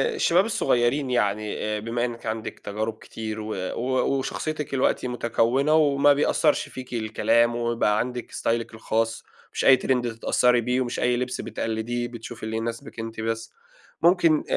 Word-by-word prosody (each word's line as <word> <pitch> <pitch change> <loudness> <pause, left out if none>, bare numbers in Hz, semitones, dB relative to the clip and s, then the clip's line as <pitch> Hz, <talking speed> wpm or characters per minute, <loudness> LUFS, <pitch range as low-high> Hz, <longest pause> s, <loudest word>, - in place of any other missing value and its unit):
الشباب 185 - +3
الصغيرين 130 - +1
يعني 105 -1 -1
بما 120 +2 -1
إنِك 120 -1 -6
عندِك 110 0 -4
تجارب 110 +2 -4
كتير 110 -1 -6
و 110 0 -4 0.2
و 130 +2 0
وشخصيتِك 150 +2 -3
دلوقتي 130 -1 +1
متكونة 125 +4 +1
وما 145 -2 +5
بيأثّرش 150 +1 +2
فيكِ 130 -1 -9
الكلام 115 +1 +2
ويبقى 115 -3 +1
عندِك 125 0 -3
استايلِك 115 0 -1
الخاص، 115 0 -1 0.3
مش - - -1
أي 130 - +8
Trend 125 -1 +1
تتأثّري 120 +1 +2
بيه 125 +2 0
ومش 120 -1 -3
أي 125 0 +2
لبس 125 0 -2
بتقلديه، 115 +2 -3
بتشوفي 115 -1 -9
اللي 110 0 -2
يناسبِك 115 0 -5
أنتِ 115 0 -5
بس. 115 0 -3 0.5
مُمكن 170 -3 +4
120 Hz, 150 wpm, -25 LUFS, 110-130 Hz, 0.5 s, أي